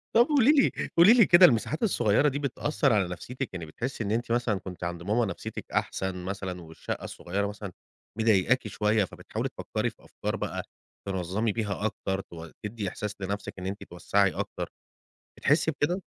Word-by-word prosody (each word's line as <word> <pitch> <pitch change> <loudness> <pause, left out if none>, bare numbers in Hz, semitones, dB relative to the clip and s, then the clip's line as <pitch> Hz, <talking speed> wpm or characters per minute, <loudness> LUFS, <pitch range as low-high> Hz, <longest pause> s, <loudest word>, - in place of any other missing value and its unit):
طب 235 +1 +7
قولي 290 -2 +5
لي 285 -3 +4 0.3
قولي 190 +7 +9
لي 230 -6 +7
كده 175 +1 +8
المساحات 145 - +2
الصغيّرة 140 - +3
دي 140 +2 -3
بتأثّر 140 -1 +1
على 100 -4 +2
نفسيّتِك، 125 +8 -5
يعني 85 -3 -5
بتحسّي 115 - -4
إن 100 - -2
أنتِ 115 +1 -1
مثلًا 120 -4 +1
كنت 90 -1 -8
عند 85 0 -4
ماما 110 +4 +2
نفسيّتِك 95 - -6
أحسن 95 -1 -1
مثلًا 95 -2 -4
والشقة 80 -1 -6
الصغيرة 100 +3 -3
مثلًا 100 -2 -6 0.5
مِضايقاكِ 110 +2 +3
شويّة، 105 0 +1
فبتحاولي - - -5
تفكّري - - -2
في - - -21
أفكار - - -4
بقى - - -3 0.4
تنظّمي 95 +4 -1
بيها 105 -1 -2
أكتر 95 -2 -2
تو 85 -2 -10
تدّي 105 -2 -3
إحساس 105 +1 -5
لنفْسِك 100 0 -4
إن 90 - -6
أنتِ 100 +2 -5
توسّعي 95 +2 +1
أكتر. - - -4 0.7
بتحسّي 155 +3 +3
بكده؟ 170 +6 -1
105 Hz, 170 wpm, -28 LUFS, 95-130 Hz, 0.7 s, قولي